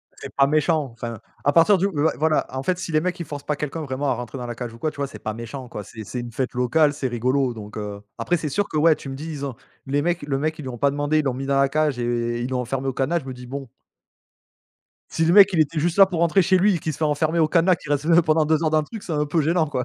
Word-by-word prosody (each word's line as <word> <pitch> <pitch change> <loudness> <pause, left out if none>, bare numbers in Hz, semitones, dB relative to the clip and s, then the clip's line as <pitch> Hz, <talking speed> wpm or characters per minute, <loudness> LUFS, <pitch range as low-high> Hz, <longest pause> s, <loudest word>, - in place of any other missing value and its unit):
c'est - - -10
pas 140 0 +4
méchant. 155 +1 +2
Enfin, 115 -1 -6 0.2
à 145 - +3
partir 170 +6 +5
du 195 +2 +1
ouais, 160 -4 +1
voilà. 155 0 +2
En 130 - -3
fait, 180 +5 0
si 165 - -5
les 155 - +3
mecs 180 +1 -2
ils 170 - -4
forcent 145 -1 -7
pas 150 -1 -2
quelqu'un 150 +2 -4
vraiment 140 0 -3
à - - +2
rentrer 125 +2 -6
dans 125 - -5
la 120 - -5
cage, 120 -1 -6
ou - - -12
quoi, 155 - -1
tu - - -20
vois? 140 -1 -2
C'est 140 - -11
pas 110 - -4
méchant 120 +3 -7
quoi, 105 - -7
c'est 110 +2 -10
c'est 125 +4 -4
une 120 -1 -7
fête 130 +2 -3
locale, 145 +5 +2
c'est 135 -3 -3
rigolo 125 +2 0
donc 105 -2 -10
heu, 105 -1 -5 0.2
après, 175 - 0
c'est 155 - -4
sûr 200 +8 -1
que 155 - -2
ouais, 155 +1 +5
tu 135 - -9
me 135 - -5
dis, 155 +4 -7
ils 145 -2 -4
ont 130 - -5 0.3
les 145 +1 +1
mecs 175 +2 0
le 145 -2 -2
mec, 155 +3 -1
ils - - -7
lui 130 - -6
ont 120 - -6
pas 140 +4 +3
demandé, 145 +2 0
il 150 - -1
l'ont 135 - +1
mis 135 +2 -5
dans 135 0 +1
la 140 - +4
cage 150 -2 0
et 120 0 -1
ils 120 - -3
l'ont 130 -1 -1
enfermé 135 +2 -3
au 135 - -1
cadenas, 145 +7 0
je 140 - -13
me 130 - -5
dis: 125 0 -10
«Bon.» 135 0 -6 1.5
Si 165 - +1
le 165 - +3
mec, 200 -1 +9
il 175 - 0
était 155 0 +2
juste 170 +4 0
là 195 - +9
pour 175 -3 -3
rentrer 170 +3 +4
chez 185 +1 +3
lui, 190 0 +3
et - - -3
qu'il 155 - -3
se - - -9
fait 160 - 0
enfermer 160 +3 +1
au 155 - +3
cadenas, 175 +2 +4
qu'il 150 -3 -10
reste, 145 +1 0
heu, 170 +1 +5
pendant 155 -1 +2
2 155 +1 +1
heures 155 - +2
dans 155 - +3
le 155 - 0
truc, 220 +5 -9
c'est 170 - -5
un 150 0 0
peu 160 +2 +1
gênant, 160 +2 +2
quoi! 130 -4 -2
145 Hz, 325 wpm, -23 LUFS, 130-160 Hz, 1.5 s, mec